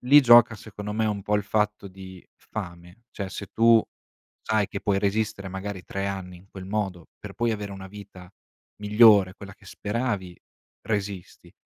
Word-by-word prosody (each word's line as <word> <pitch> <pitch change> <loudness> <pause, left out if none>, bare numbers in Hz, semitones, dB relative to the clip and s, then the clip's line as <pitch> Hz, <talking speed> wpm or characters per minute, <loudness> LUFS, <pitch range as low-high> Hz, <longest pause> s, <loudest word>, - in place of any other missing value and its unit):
lì 140 +4 +7
gioca 120 -2 +7
secondo 105 -1 -8
me 110 +1 0
un 105 -2 -2
po' 105 - -1
il 105 - -1
fatto 105 -1 -1
di 95 -1 -12
fame: 90 +1 -9
cioè, 100 -2 -5
se 100 - -6
tu 115 0 +5 0.6
sai 110 -2 +1
che 100 - -5
puoi 100 -1 +1
resistere 100 -1 -1
magari 95 0 -6
3 100 0 -4
anni 95 -2 -5
in 95 +3 -21
quel 95 -1 -9
modo, 95 -4 -3
per - - -9
poi 120 0 0
avere 105 -2 -5
una 95 -1 -9
vita 95 -3 -12 0.5
migliore, 105 -3 +5
quella 100 -1 -11
che 100 - -21
speravi, 105 -4 -3 0.4
resisti. 100 -4 -5
100 Hz, 170 wpm, -25 LUFS, 95-110 Hz, 0.6 s, lì